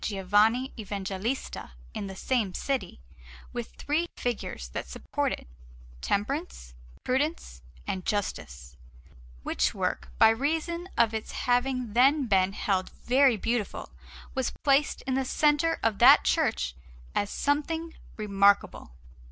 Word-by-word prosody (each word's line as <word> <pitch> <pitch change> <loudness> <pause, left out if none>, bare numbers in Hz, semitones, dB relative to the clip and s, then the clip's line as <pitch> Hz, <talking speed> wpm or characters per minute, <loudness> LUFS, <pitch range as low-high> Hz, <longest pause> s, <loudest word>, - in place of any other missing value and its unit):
Giovanni 210 +6 +2
Evangelista 200 - -4 0.2
in 200 - -4
the 190 - -7
same 215 -3 -1
city, 270 - -2 0.5
with - - -6
three 320 +4 -1
figures 210 - -4
that 60 - -5
support - - -2
it - - -5 0.6
Temperance, 205 - -2 0.3
Prudence, 260 - -1 0.2
and 185 - -3
Justice; 65 - -4 0.7
which - - 0
work, 60 - -2
by - - +7
reason 320 +9 -1
of 225 -1 +3
its 220 -1 -4
having 245 -2 0
then 270 +4 +4
been 195 -3 +2
held 190 -2 -1
very 260 -1 +3
beautiful, 230 +1 -2 0.4
was 260 -2 0
placed 280 +1 +2
in 265 - -2
the 265 +1 +1
centre 300 +4 +2
of 225 -3 +1
that - - +8
church 60 0 +1 0.4
as 205 - 0
something 320 +5 -1 0.2
remarkable. 200 - +2
230 Hz, 120 wpm, -28 LUFS, 195-275 Hz, 0.7 s, that